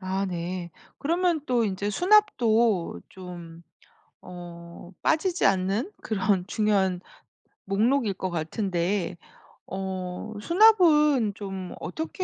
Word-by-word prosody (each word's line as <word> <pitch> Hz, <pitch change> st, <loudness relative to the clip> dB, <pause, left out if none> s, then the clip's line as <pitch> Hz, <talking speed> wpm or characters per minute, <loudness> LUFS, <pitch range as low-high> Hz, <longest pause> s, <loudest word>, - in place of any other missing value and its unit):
아 190 Hz, +1 st, -2 dB
네. 175 Hz, -1 st, -4 dB, 0.3 s
그러면 340 Hz, +1 st, +1 dB
또 240 Hz, -3 st, +2 dB
인제 200 Hz, 0 st, -2 dB
수납도 235 Hz, -, +3 dB
좀 175 Hz, -3 st, -10 dB, 0.6 s
어 175 Hz, 0 st, -11 dB
빠지지 350 Hz, +3 st, +1 dB
않는 195 Hz, -, +1 dB
그런 195 Hz, -3 st, 0 dB
중요한 195 Hz, -4 st, +1 dB, 0.7 s
목록일 220 Hz, +3 st, +1 dB
것 185 Hz, 0 st, -4 dB
같은데 175 Hz, +2 st, -2 dB, 0.5 s
어 190 Hz, +2 st, -5 dB
수납은 300 Hz, -, +5 dB
좀 195 Hz, -3 st, -6 dB
어떻게 325 Hz, +4 st, -4 dB
195 Hz, 185 characters per minute, -26 LUFS, 180-255 Hz, 0.7 s, 수납은